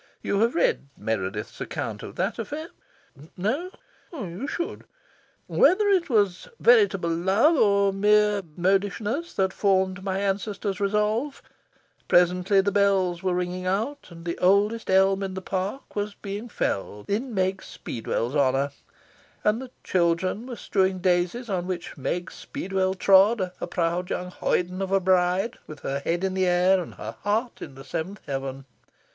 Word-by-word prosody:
(You 200 - 0
have 230 +3 +2
read 170 -4 +1
Meredith's 105 -1 -3
account - - -4
of - - -9
that - - -1
affair? 315 +3 -5 0.7
No? 260 - -1 0.4
You 220 - -5
should.) 340 +4 -4 0.6
Whether 410 +3 +4
it 370 -5 +2
was 205 -6 +1
veritable 410 - +4
love 190 - +3
or 200 -5 +3
mere 210 +1 +3 0.2
modishness 205 - 0
that 190 -1 +1
formed 190 -2 +1
my 190 -1 -1
ancestor's 200 0 -2
resolve, 210 +7 0 0.6
presently 180 +2 +4
the 200 +1 0
bells 190 -3 +2
were 185 -1 0
ringing 180 +1 -2
out, 225 +10 -2
and 165 -1 -12
the 170 - -3
oldest 205 +5 +2
elm 195 +1 +4
in 190 -1 -3
the - - -3
park 190 +7 -4
was 205 0 -2
being 205 +4 -6
felled, 105 - -3
in 235 +6 -1
Meg 190 0 0
Speedwell's 120 +3 -4
honour, 140 0 +2 0.7
and 215 +4 +2
the 260 - -8
children 185 +5 0
were 250 - -5
strewing 190 -4 0
daisies 180 +6 0
on 185 -4 -2
which 180 -2 -4
Meg 175 +5 -3
Speedwell 190 0 -2
trod, 195 +1 +4
a - - -2
proud 175 +1 -1
young 180 0 -3
hoyden 180 +1 -1
of 190 0 -2
a 195 - +4
bride, 185 +4 +1
with 155 -1 -10
her 140 +1 -2
head 170 +6 -1
in 190 -1 0
the 190 -1 +1
air 180 +1 +4
and 170 - -9
her - - -7
heart 220 +4 -1
in 140 - -8
the 135 - -10
seventh 175 +9 -4
heaven. 135 -1 -4
190 Hz, 155 wpm, -25 LUFS, 180-210 Hz, 0.7 s, Whether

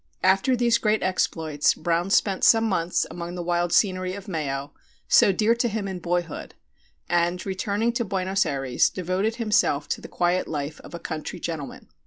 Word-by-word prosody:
After 195 +8 +3
these 235 -1 +2
great 215 0 +1
exploits 160 -5 +1
Brown 170 +3 -1
spent 195 -1 +2
some 225 -1 +6
months 180 -5 0
among 175 0 -6
the 175 - -4
wild 175 0 0
scenery 185 -2 +2
of 200 +1 -9
Mayo, 140 -6 -3 0.3
so - - +6
dear 215 +4 +2
to 235 +1 0
him 215 -2 -3
in 190 -2 -5
boyhood, 175 -2 -3 0.5
and, 175 +1 0
returning 205 +4 -1
to 235 - 0
Buenos 195 -1 0
Ayres, 135 -6 +1
devoted 185 +5 -1
himself 210 - +1
to - - -2
the - - -9
quiet 175 +1 0
life 150 0 -4
of - - -10
a - - -6
country 160 +2 -5
gentleman. 160 -4 -6
185 Hz, 175 wpm, -25 LUFS, 170-205 Hz, 0.5 s, some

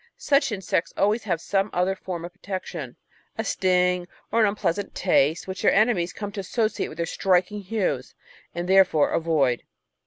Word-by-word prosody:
Such 280 -3 +2
insects 190 -4 -1
always 215 +3 +1
have 175 -5 0
some 195 +3 0
other 180 +2 +1
form 175 -3 -6
of 175 - -9
protection, 195 -1 -6 0.4
a 220 - -1
sting 180 -3 +1 0.2
or 230 - +3
an 215 - +5
unpleasant 200 -1 -2
taste, 160 -3 +2
which 190 0 -5
their - - +4
enemies 200 -5 +2
come 205 -1 -6
to 205 - -6
associate 215 +3 -1
with 155 - -11
their 170 - -1
striking 185 +3 +1
hues 200 +1 -2 0.4
and 175 +1 -3
therefore 185 -5 +4
avoid. 150 -7 +1
190 Hz, 165 wpm, -25 LUFS, 175-205 Hz, 0.4 s, an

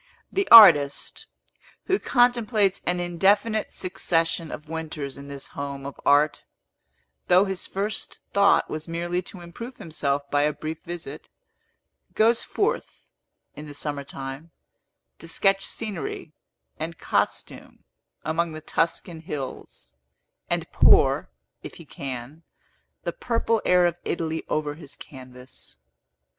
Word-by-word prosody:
The 395 0 0
artist, 145 -11 +8 0.6
who 385 +1 +1
contemplates 235 -6 +2
an 180 0 +1
indefinite 200 +5 +1
succession 165 -3 -1
of 150 - -8
winters 155 -3 -5
in 140 0 -10
this 140 -1 -8
home 140 -1 -6
of 140 - -8
art 145 +1 +3 0.8
(though 180 +2 +5
his 190 -2 -4
first 200 +2 -4 0.2
thought 200 0 +4
was 155 +1 -5
merely 175 +2 -2
to 185 0 -9
improve 230 +9 -9
himself 145 -3 -2
by 145 - +3
a 150 +1 +2
brief 155 +2 -6
visit), 165 -4 -8 0.9
goes 230 +2 +4
forth, 445 +4 -3 0.4
in 150 - -9
the 145 - -9
summer 145 -1 -3
time, 135 +3 -8 0.7
to 165 - -10
sketch 195 +3 +2
scenery 195 -7 -5 0.5
and 165 +1 -5
costume - - -2 0.4
among 165 +1 -1
the 155 - -7
Tuscan 165 +1 -1
hills, 140 - -7 0.6
and - - 0
pour, - - +5 0.3
if - - -9
he - - -12
can, 135 +3 -7 0.6
the - - -3
purple 230 - 0
air 180 -1 +5
of 170 -1 0
Italy 160 -1 -2
over 150 -1 -1
his 145 -2 -11
canvas. 130 -1 -10
165 Hz, 125 wpm, -25 LUFS, 145-195 Hz, 0.9 s, artist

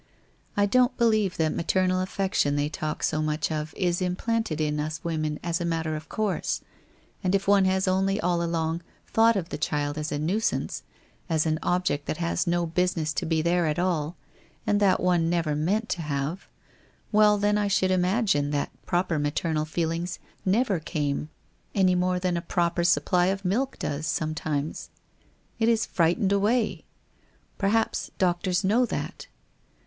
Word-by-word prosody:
I 205 - +4
don't 250 +4 +3
believe 215 -5 +2
that 160 -1 +1
maternal 185 +1 +1
affection 185 -6 0
they 145 +1 0
talk 155 0 -4
so 155 - +1
much 155 +1 -1
of, 155 0 -3
is 175 -1 0
implanted 185 -1 -1
in 150 -1 0
us 155 +1 -3
women 155 -2 -2
as 170 0 -1
a - - 0
matter 165 -2 -1
of 155 +1 -8
course, 215 -3 -1 0.6
and 185 +1 +2
if 195 0 -1
one 200 -1 +5
has 190 0 +1
only 195 +2 +1
all 175 -2 +1
along, 165 0 -1 0.2
thought 225 +1 +4
of 180 -3 -2
the - - -5
child 145 0 -1
as 150 0 -3
a 145 - -1
nuisance, 180 +9 -1 0.5
as 160 -1 +2
an 155 -1 0
object 175 -5 0
that - - -2
has 170 +1 -1
no 175 0 +1
business 165 -2 0
to 130 - -2
be 160 -1 +1
there 170 0 +2
at 150 - -1
all, 175 -3 -1 0.5
and 205 - +2
that 200 -2 +4
one 175 -2 +2
never 165 -3 0
meant 200 +9 0
to 175 - -2
have 150 +3 -3 0.3
— - - -34
well, 210 -1 +5
then 205 +1 +2
I 210 -1 +1
should 190 -1 +2
imagine 185 -5 +2
that 145 -1 -1 0.2
proper 175 -3 +1
maternal 155 +1 0
feelings 165 +2 -2 0.3
never 200 -1 +2
came 150 -2 -2 0.5
any 190 -2 +4
more 180 0 +1
than 180 -1 0
a - - -2
proper 170 0 0
supply 175 +1 +3
of 195 +1 -1
milk 255 +9 0
does, 150 +2 -3
sometimes. 155 -1 -2 0.7
It 225 0 +3
is 225 -1 +2
frightened 180 +4 +1
away. 215 +3 +1 0.7
Perhaps 215 +3 +1
doctors 180 +1 +1
know 230 +6 +3
that? - - -5
175 Hz, 170 wpm, -26 LUFS, 155-195 Hz, 0.7 s, one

